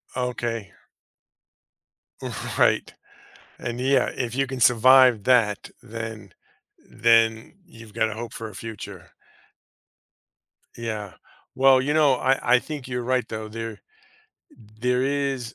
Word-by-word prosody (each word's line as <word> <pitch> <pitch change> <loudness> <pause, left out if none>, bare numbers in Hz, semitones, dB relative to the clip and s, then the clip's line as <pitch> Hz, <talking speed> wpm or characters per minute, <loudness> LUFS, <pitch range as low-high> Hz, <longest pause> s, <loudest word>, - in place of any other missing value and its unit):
Okay. 120 -4 -3 1.9
Right, - - +2 0.7
and 120 0 -5
yeah, 135 0 +2
if 125 -2 -4
you 135 0 +1
can 130 -1 -6
survive 125 -2 +6
that, 115 -5 +2
then 110 -3 -8 0.6
then 115 -1 +2
you've 115 - -14
got 110 - 0
a - - -5
hope 115 +1 -7
for 115 - -7
a 105 - -13
future. 110 +1 -9 1.7
Yeah. 110 -4 -5 0.4
Well, 130 0 +5
you 145 +3 -1
know, 150 -4 +4
I 130 -1 +2
I - - +4
think 145 -2 -7
you're 125 -1 -3
right 125 -1 0
though, 110 -1 -5
there 115 -1 -7 1.0
there 125 +1 +1
is, 135 -3 -2
120 Hz, 120 wpm, -24 LUFS, 110-130 Hz, 1.9 s, survive